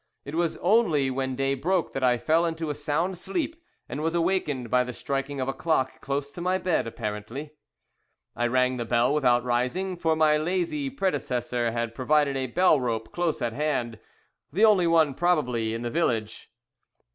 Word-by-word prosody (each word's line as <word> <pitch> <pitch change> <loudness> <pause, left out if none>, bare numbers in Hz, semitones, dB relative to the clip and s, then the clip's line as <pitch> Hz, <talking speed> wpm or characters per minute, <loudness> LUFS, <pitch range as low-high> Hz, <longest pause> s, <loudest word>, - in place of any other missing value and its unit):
It 140 - -7
was 170 0 0
only 175 - +3
when 130 0 -2
day 135 +1 0
broke 170 +6 0
that 135 - -3
I 125 -1 +4
fell 160 +7 +2
into 165 -2 -2
a - - -2
sound 155 +5 -1
sleep, 320 - -3 0.3
and 145 - -5
was 165 +2 -1
awakened 165 - 0
by 125 0 +4
the 125 0 -6
striking 135 +2 -3
of 130 - -1
a 135 - -1
clock, 135 -5 -1
close 140 +1 -3
to 175 - -8
my 185 +1 +1
bed, 180 -9 0
apparently. 115 +6 -5 0.8
I 120 - +1
rang 125 +1 +2
the 120 - -3
bell, 120 +3 +2
without 125 -5 +3
rising, 125 +11 -1
for 165 -2 +1
my 155 -1 +4
lazy 185 - -1
predecessor 125 - -1
had 115 0 -2
provided 140 +3 +2
a 130 -1 -1
bell 175 +3 +4
rope 115 -3 -3
close 175 -6 -1
at 115 -1 -1
hand, 125 -5 -2 0.5
the 200 +9 +4
only 195 -5 +4
one 160 -4 +4
probably 125 -9 +1
in 115 - -5
the 120 - -3
village. 115 -9 -1
145 Hz, 180 wpm, -26 LUFS, 125-170 Hz, 0.8 s, I